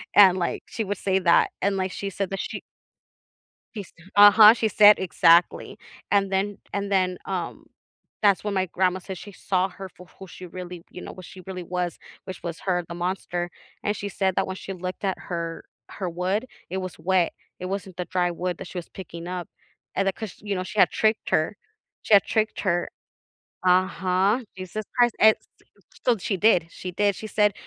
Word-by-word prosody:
and, 190 -2 +8
like, 175 - -2
she 225 - -3
would 200 -1 -3
say 190 -1 +1
that, 170 -2 +4
and, 195 0 +1
like, 190 0 -1
she 200 +1 -4
said 195 -1 -3
that 195 - -4
she - - -5 1.2
she 205 - -4
st 175 +1 -18
Uh-huh, 210 +2 +9
she 230 -2 0
said 210 0 +7
Exactly, 170 -1 +3 0.3
and 195 -1 +2
then 195 +1 0
and 200 0 -2
then, 185 -2 +2
um, 180 -3 -4 0.6
that's 200 -2 +4
when 205 -1 -2
my 190 -1 +1
grandma 185 +1 0
said 190 0 -7
she 205 +3 -10
saw 185 0 0
her 190 +1 -9
for 180 0 -16
who 190 - -10
she 180 +1 -10
really 180 -1 -8
you 180 - -10
know, - - -7
what 185 - -11
she 185 +2 -12
really 185 -1 -6
was, 175 0 -3 0.3
which 185 -1 -8
was 170 -2 -5
her, 180 -2 0
the 170 - -7
monster, 175 -1 -3 0.3
and 205 +1 0
she 205 - -4
said 190 -2 0
that - - +1
when 190 - -4
she 195 - -8
looked 185 +2 -6
at 190 -1 -1
her 170 -2 -5 0.3
her 185 -3 -4
wood, 185 +7 -1 0.2
it 190 - -3
was 185 -2 -5
wet, 175 +1 +1 0.3
it 185 - -5
wasn't 190 -1 -5
the 180 - -3
dry 180 -1 0
wood 175 0 -3
that 190 - -8
she - - -8
was 175 - -5
picking 170 -2 -9
up, 180 -1 -4 0.5
and 195 0 0
then 195 - +2
'cause, 220 -1 -7
you 205 -2 -3
know, 185 - -2
she 200 +2 -5
had - - +6
tricked 220 0 0
her. 160 +6 +1 0.5
She - - +1
had 200 - +8
tricked 220 -1 -1
her 175 -3 0 0.8
Uh-huh. 185 +3 +2 0.2
Jesus 185 +3 -5
Christ, 240 -1 +4
a - - +7
s - - -32
uh, - - -30 0.2
so 240 -3 +4
she 195 +1 -2
did, 180 -5 +4
she 185 - -7
did, 205 +2 +1
she 215 - -7
said 210 -1 +2
185 Hz, 210 wpm, -25 LUFS, 180-200 Hz, 1.2 s, Uh-huh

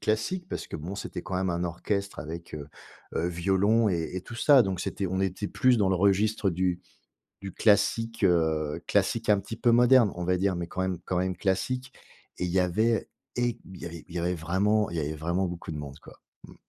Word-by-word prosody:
classique, 110 +13 -1
parce - - -4
que - - -10
bon 85 +6 -6
c'était - - -6
quand 95 - -4
même 95 0 0
un 85 0 -1
orchestre 100 +4 -2
avec, 85 +2 -7
heu 75 -1 -7 0.5
heu, 85 - 0
violon 95 +6 +2
et 85 -4 -1
et - - -2
tout 120 - -10
ça, 135 +1 +6
donc 95 -3 -2
c'était 100 +1 -2
on 95 +1 -1
était 95 +1 -1
plus 125 +5 +3
dans 100 -3 +3
le 95 - +2
registre 100 +2 +2
du 90 0 0 0.6
du 100 0 -6
classique, 115 +1 +2
heu, 80 -4 +2
classique 115 0 +1
un 105 -1 +5
petit 110 +3 -7
peu 120 - +3
moderne, 120 -2 +5
on 90 - -4
va 90 +1 +1
dire, 95 0 +1
mais 85 -1 -4
quand 95 - -4
même 95 -2 -1
quand 90 - -2
même 90 0 0
classique. 125 +8 -1 0.5
Et 90 - -1
il 90 - -3
y 95 - +3
avait 110 +5 +1 0.3
é 120 -1 0 0.2
il 85 -3 -8
y - - 0
avait 90 +1 0
vraiment 95 +6 +1
il - - -5
y - - +1
avait 75 +1 -2
vraiment 85 +5 -1
beaucoup 85 -2 -6
de - - -5
monde, 70 0 -8
quoi, - - -14 0.3
mmh. - - -14
95 Hz, 220 wpm, -28 LUFS, 85-105 Hz, 0.6 s, ça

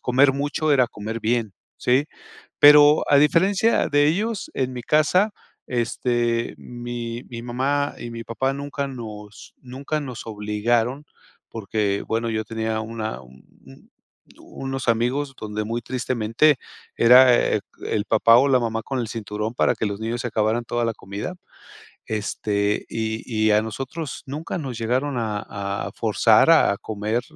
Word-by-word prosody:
comer 135 +2 +4
mucho 145 +2 -1
era 130 -3 +4
comer 110 0 -6
bien, 115 -2 0 0.2
¿sí? 130 +4 +2 0.5
Pero 150 +1 +8
a 145 - +6
diferencia 190 +9 +3
de 145 0 +4
ellos, 205 +6 -1
en 130 -1 -1
mi 125 - -5
casa, 155 - +3 0.4
este, 120 -1 -1
mi 120 0 -6
mi 115 -1 -7
mamá 135 +4 -1
y 120 - -6
mi 115 0 -7
papá 130 +4 -2
nunca 140 0 -4
nos 110 -5 -9
nunca 135 +4 -5
nos 130 -5 -7
obligaron, 115 +5 -1 0.4
porque 105 -2 -2
bueno 115 +1 -1
yo 110 0 -1
tenía 110 0 -3
una 110 - -5
un 65 0 -17 0.3
un 65 - -17 0.5
unos 135 -1 -6
amigos 125 +5 0
donde 105 0 -4
muy 115 +2 -3
tristemente 125 +3 +1 0.4
era, 125 +1 +7 0.2
eh, - - +1 0.3
el 105 -1 -1
papá, 115 +1 +5
o, 135 +3 +4
la 135 -2 +4
mamá 115 -1 -2
con 135 +3 -4
el 115 -2 -3
cinturón 105 0 -4
para - - +2
que - - -2
los 100 -1 -3
niños 115 +2 -3
se 125 - -3
acabaran 110 +1 0
toda 120 0 -1
la 115 - -1
comida. 100 - -6 0.7
Este, 105 -1 -1
y 110 0 -3
y 110 -1 +2
a 105 +1 +4
nosotros 135 +7 -6
nunca 150 +6 -5
nos 130 -6 -5
llegaron 130 +4 -1
a 110 -2 -2 0.5
a - - -8
forzar - - +3
a 100 - +4
comer 110 +2 -2
120 Hz, 155 wpm, -23 LUFS, 110-135 Hz, 0.7 s, Pero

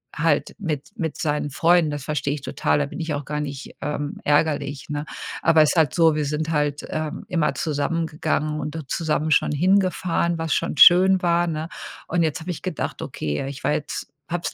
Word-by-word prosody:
halt 150 -1 +1
mit 155 -8 -4
mit 160 -3 -3
seinen 150 -1 -1
Freunden. 165 +2 +3
Das 145 -2 -5
verstehe 145 -1 -1
ich 145 - -5
total. 145 - 0
Da 145 - 0
bin - - -8
ich 160 -2 -2
auch 145 0 -3
gar 150 +1 -3
nicht, 140 -2 -6
ähm, 145 0 -3
ärgerlich, 145 -2 +1
ne? 145 0 -3 0.4
Aber 165 -1 +5
ist 155 - +3
halt 160 -6 +3
so, 165 -3 +4
wir 150 -1 0
sind 150 +2 -2
halt, 150 -2 0
ähm, 155 -1 -4
immer 165 -5 +1
zusammen 155 +3 -1
gegangen 155 -1 -1
und 155 +1 -4
zusammen 155 +1 -1
schon - - +3
hingefahren, 175 0 +1
was 165 -2 0
schon - - -1
schön 185 +4 +7
war, 175 0 +2
ne? 160 -1 -3 0.4
Und 170 0 +1
jetzt 160 +2 -1
habe 170 +2 -8
ich 180 0 -4
gedacht: 185 -5 -4
„Okay, 75 -1 -3
äh, 135 - -4
ich 140 -1 -9
war 145 - +2
jetzt 150 - -4 0.2
habe 175 0 -2
es - - -18
155 Hz, 205 wpm, -23 LUFS, 145-165 Hz, 0.4 s, schön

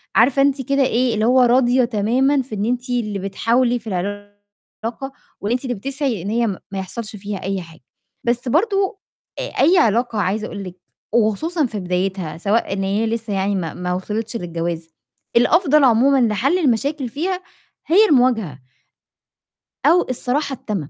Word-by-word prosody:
عارفة 265 +4 +4
أنتِ 275 -1 +2
كده 275 0 +3
إيه، 250 -1 +1
اللي 215 0 0
هو 255 +1 +5
راضية 245 0 +4
تمامًا 250 +6 +1
في 240 -4 -7
إن 205 +1 -1
أنتِ 250 +2 -2
اللي 215 -5 -1
بتحاولي 235 +5 +1
في 220 - -15
العلاقة، 205 +6 -6 0.3
واللي 210 +4 -1
أنتِ 255 - -2
اللي 245 - -1
بتسعي 265 - -2
إن 200 - -4
هي 235 +1 +1
م 195 - -3
ما 195 - -3
يحصلش 215 +3 -6
فيها 200 -1 -6
أي 195 0 -2
حاجة، 165 -4 -14 0.4
بس 240 +1 -1
برضه 390 - +1 0.4
آآ - - -2 0.2
أي 345 +6 +5
علاقة 230 -1 +2
عايزة 210 +3 -1
أقول 200 -1 -7
لِك 180 -1 -8 0.4
وخصوصًا 250 - +1
في 215 -4 -4
بدايتها 180 -2 -2
سواء 205 +3 0
إن 195 0 -2
هي 205 +4 0
لسّه 225 -2 -3
يعني 195 +1 0
ما 165 -4 -3
ما 180 0 -3
وصلِتش 215 +5 -4
للجواز، 170 -2 -4 0.5
الأفضل 300 +3 +4
عمومًا 260 +2 +4
لحَل 260 - +1
المشاكل 275 -1 0
فيها 360 +7 -3 0.4
هي 405 +7 +6
المواجهة 230 - +2 1.3
أو 355 +1 +5
الصراحة 270 +3 -1
التامة، 195 - -5
230 Hz, 165 wpm, -20 LUFS, 200-265 Hz, 1.3 s, هي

